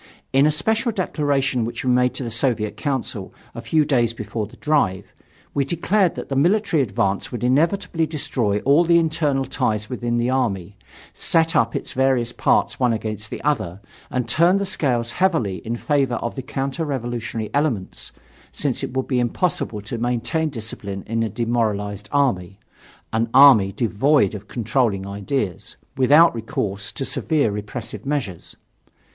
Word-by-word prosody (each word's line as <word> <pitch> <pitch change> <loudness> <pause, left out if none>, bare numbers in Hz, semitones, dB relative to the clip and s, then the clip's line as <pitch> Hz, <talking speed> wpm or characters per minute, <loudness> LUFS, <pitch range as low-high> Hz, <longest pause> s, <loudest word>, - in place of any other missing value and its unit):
In 135 +2 +5
a - - +3
special 220 - 0
declaration 140 - 0
which 120 +3 -4
we 125 - +3
made 125 0 +2
in 130 - -4
the 115 - -4
Soviet 115 -2 0
Council 130 -8 -3 0.2
a - - -7
few 155 -2 +2
days 120 -5 +2
before 105 -1 -4
the - - -17
drive, 100 -11 0 0.4
we 140 - +1
declared 175 +5 +1
that - - -6
the 135 - -3
military 175 +2 +2
advance 100 -4 -1
would 120 - -5
inevitably 165 +5 +1
destroy 120 -9 -1
all 145 +5 +4
the 170 0 +4
internal 155 -4 +1
ties 110 -5 -1
within 120 -1 -1
the 120 0 +1
army, 100 -8 -1 0.4
set 165 0 +1
up 115 0 +2
its - - -4
various 130 -3 +1
parts - - +1
one 125 -2 +3
against 110 -1 -4
the - - -7
other 110 - -1 0.3
and 125 -1 -2
turn 175 +4 +4
the 200 - -1
scales 125 -10 0
heavily 160 - +1
in 115 +1 -4
favor 135 -1 0
of 115 0 -3
the 135 - -5
counter 135 +4 -3
revolutionary 120 -5 -4
elements, 140 -10 -2 0.4
since - - -2
it 130 - -4
would 130 - 0
be 130 -2 +1
impossible 120 - -1
to 115 +2 -5
maintain 120 +6 0
discipline 110 -6 -6
in 115 +1 -1
a 115 - 0
demoralized 105 -3 -2
army 100 -10 0 0.6
an 115 +1 +1
army 130 -8 +8
devoid 120 +2 +2
of 105 -1 -8
controlling 115 -4 0
ideas 100 - -3 0.2
without 145 +6 +6
recourse 100 -3 -3
to 135 - -4
severe 150 -7 0
repressive 105 +3 -6
measures. 135 - -4
125 Hz, 160 wpm, -22 LUFS, 110-145 Hz, 0.6 s, army